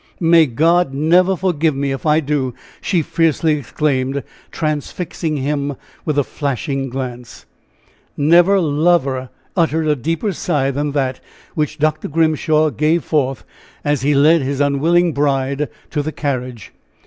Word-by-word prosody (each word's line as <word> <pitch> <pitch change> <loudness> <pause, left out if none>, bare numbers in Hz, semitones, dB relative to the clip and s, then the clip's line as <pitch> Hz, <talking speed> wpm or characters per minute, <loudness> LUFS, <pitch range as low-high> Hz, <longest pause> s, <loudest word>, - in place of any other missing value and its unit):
"May 165 -2 +5
God 160 +3 +2
never 175 +6 +3
forgive 165 -4 0
me 140 0 -1
if 135 +3 -4
I 155 +1 +4
do!" 140 -4 -2 0.3
she 175 -4 0
fiercely 160 0 +1
exclaimed, 140 -1 -1 0.3
transfixing 155 +1 -3
him 140 +1 -2 0.3
with 150 -2 -1
a 145 - +3
flashing 135 0 -3
glance. 125 -2 -7 0.7
Never 175 +6 +5
lover 145 -5 +1 0.3
uttered 160 -3 +1
a 150 - +3
deeper 165 - -2
sigh 145 -5 0
than 145 +1 -2
that 130 -3 -1 0.3
which 150 -1 -2
Dr. 155 0 0
Grimshaw 155 0 +2
gave 155 +5 +1
forth 135 -5 -1 0.4
as 145 -1 0
he 145 +2 +2
led 155 +4 +5
his 140 +1 -2
unwilling 160 +5 +2
bride 140 0 0 0.2
to 150 - 0
the 155 +2 -4
carriage. 130 -6 -4
150 Hz, 135 wpm, -18 LUFS, 135-160 Hz, 0.7 s, May